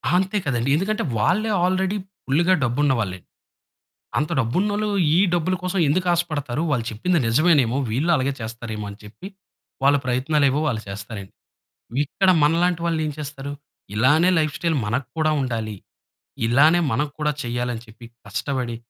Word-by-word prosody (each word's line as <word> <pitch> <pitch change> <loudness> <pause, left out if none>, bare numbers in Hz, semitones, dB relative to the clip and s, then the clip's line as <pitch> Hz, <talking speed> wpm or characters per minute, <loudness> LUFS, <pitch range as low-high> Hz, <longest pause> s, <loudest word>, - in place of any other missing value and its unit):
అంతే 190 +3 +1
కదండీ 125 -2 0
ఎందుకంటే 210 +7 -1 0.2
వాళ్ళే 190 - +2
ఆల్రెడీ 185 +2 +1 0.3
ఫుల్‌గా 170 +7 +3
డబ్బున్న 135 +3 +2
వాళ్ళే. 95 -4 -3 1.0
అంత 150 - 0
డబ్బున్నోళ్లు 205 - 0 0.3
ఈ - - +4 0.2
డబ్బుల 175 +2 +1
కోసం 185 +1 -1
ఎందుకు 180 +6 +1
ఆశపడతారు. 155 -6 -2
వాళ్ళు 120 -5 0
చెప్పింది 170 +11 +1
నిజమేనేమో 135 -1 +3
వీళ్ళు 140 +10 +1
అలాగే 140 -1 0
చేస్తారేమో 110 -1 -6
అని 100 - -10
చెప్పి, 110 - -10 0.6
వాళ్ళ 140 +1 +5
ప్రయత్నాలేవో 135 +2 +2
వాళ్ళు 115 -6 -1
చేస్తారండి. 100 0 -7 0.7
ఇక్కడ 190 +6 +1
మనలాంటి 170 +3 +2
వాళ్ళు 165 -2 0
ఏం 150 - -2
చేస్తారు? 140 -1 -6 0.4
ఇలానే 150 +10 +4
లైఫ్‌స్టైల్ 155 +2 0
మనకు 120 +4 -2
కూడా 155 -1 +2
ఉండాలి. 115 -5 -3 0.7
ఇలానే 150 +9 +5
మనకూడా 150 +4 -1
చేయాలి 120 +1 -2
అని 115 - -7
చెప్పి 115 +2 -13 0.2
కష్టపడి 120 +3 -3
145 Hz, 135 wpm, -22 LUFS, 120-170 Hz, 1.0 s, వాళ్ళ